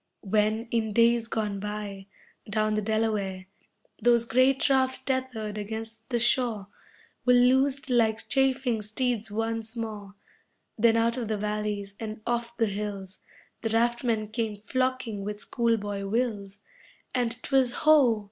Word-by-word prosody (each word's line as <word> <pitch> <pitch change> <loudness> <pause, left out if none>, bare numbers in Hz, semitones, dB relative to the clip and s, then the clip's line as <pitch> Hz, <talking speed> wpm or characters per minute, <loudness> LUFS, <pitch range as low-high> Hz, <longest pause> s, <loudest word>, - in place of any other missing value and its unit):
When, 215 +3 +1
in 220 -2 0
days 235 0 +4
gone 210 -3 -2
by, 205 -1 -5 0.4
down 215 0 +1
the 215 - 0
Delaware 210 -3 -1 0.6
Those 235 -1 +4
great 255 +4 +3
rafts 260 -1 +2
tethered 245 -6 -3
against 225 +2 -6
the 240 - +1
shore, 235 -4 +1 0.5
Were 250 0 +5
loosed 265 +3 +3
like 225 -3 +1
chafing 265 -4 +1
steeds 225 +1 -1
once 225 +1 -2
more, 210 -3 -6 0.6
Then 230 +1 +4
out 230 +2 +2
of 240 -3 -3
the 215 -1 -1
valleys, 210 -1 -3
and 215 -1 -6
off 235 0 -2
the 230 - +3
hills 200 -2 -5 0.4
The 225 - -1
raftmen 230 -1 +1
came 220 -1 -2
flocking 255 -1 -2
with 210 +1 -5
school 230 0 +1
boy 205 -1 -4
wills 205 -3 -2 0.5
And 245 -2 0
'twas 265 -3 +2
ho! 275 -8 +6
225 Hz, 140 wpm, -27 LUFS, 210-240 Hz, 0.6 s, ho